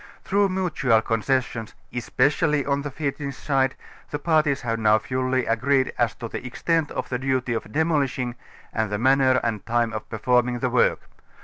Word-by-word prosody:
Through 200 0 +2
mutual 150 -12 +1
concessions, 115 0 -1 0.2
especiallj' 140 +4 +1
on 140 0 +1
the 145 - -4
Finnish 140 0 -4
side, 135 -2 +1 0.3
the 145 - -2
parties 155 -3 +2
have 115 -1 -2
now 110 -1 +5
fully 130 +2 -1
agreed 130 +4 +1
as 120 -2 0
to 115 - -6
the - - -6
extent 155 +5 0
of - - -4
the 125 - -2
duty 130 -2 0
of 110 -3 -4
demolishing, 140 -5 0 0.4
and 110 -2 0
the 105 - 0
manner 130 +2 +4
and 110 -4 -2
time 120 0 0
of 110 - -6
performing 125 +2 +1
the 125 0 -1
work. 125 - +3
130 Hz, 170 wpm, -24 LUFS, 115-140 Hz, 0.4 s, now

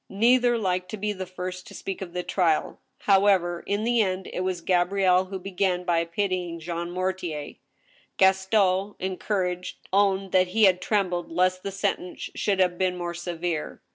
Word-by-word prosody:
Neither 240 +4 +3
liked 185 -3 -1
to 215 - -5
be 210 +1 -2
the 185 -2 -6
first 185 0 -6
to - - -11
speak 195 0 -5
of 175 -3 -6
the 180 0 -2
trial. 170 -5 0 0.2
However, 190 -3 +3
in 205 +1 0
the 235 0 +3
end 185 -2 -1
it - - -3
was 185 -1 -1
Gabrielle 185 +1 +3
who 190 +1 -5
began 185 -1 -1
by 170 -2 +2
pitying 180 -1 -2
Jean 170 +1 -4
Mortier. 180 -4 -3 0.6
Gas 190 0 +4
ton, 195 -1 +2
encouraged, 185 -1 -2 0.2
owned 195 -1 +2
that 185 -1 +4
he 215 +5 +1
had 185 -2 +5
trembled 180 -6 -1
lest 185 +2 +1
the 195 - -4
sentence 195 -2 -3
should 200 -2 0
have 180 -2 +2
been 185 -1 +1
more 175 -1 -3
severe. 170 -2 -4
185 Hz, 170 wpm, -26 LUFS, 180-195 Hz, 0.6 s, had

